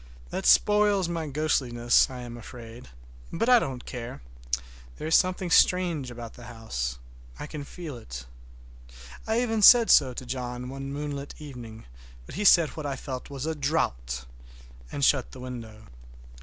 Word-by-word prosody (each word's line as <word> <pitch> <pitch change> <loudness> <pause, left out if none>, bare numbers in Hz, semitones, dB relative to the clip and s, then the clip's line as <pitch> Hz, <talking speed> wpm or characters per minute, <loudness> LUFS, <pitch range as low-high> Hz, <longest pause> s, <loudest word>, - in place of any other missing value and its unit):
That - - -2
spoils 205 -3 +4
my 165 -2 -3
ghostliness, 130 -5 +2
I 130 -1 -7
am 120 -1 -8
afraid; 120 0 -11 0.4
but 230 - -1
I 250 -1 +7
don't 130 - -5
care—there - - -7
is 160 - 0
something 185 -1 +2
strange 170 -7 +3
about 120 -1 -8
the 120 - -12
house—I - - -7
can 150 -1 -7
feel 155 -2 -8
it. 60 - -8 1.0
I 225 +2 +2
even 225 -3 0
said 235 +2 +8
so 130 -4 +5
to 130 - -6
John 125 0 -5
one 135 +1 -6
moonlight 145 0 -5
evening, 120 -7 -10 0.4
but - - -11
he 205 +4 -3
said 170 -5 +7
what 155 -2 -6
I 140 - -2
felt 130 -1 -7
was 140 0 -5
a 160 - -1
draught, 60 - -1 0.7
and 140 - +1
shut 130 -3 +2
the 130 - -10
window. 115 -4 -8
130 Hz, 155 wpm, -27 LUFS, 115-155 Hz, 1.0 s, said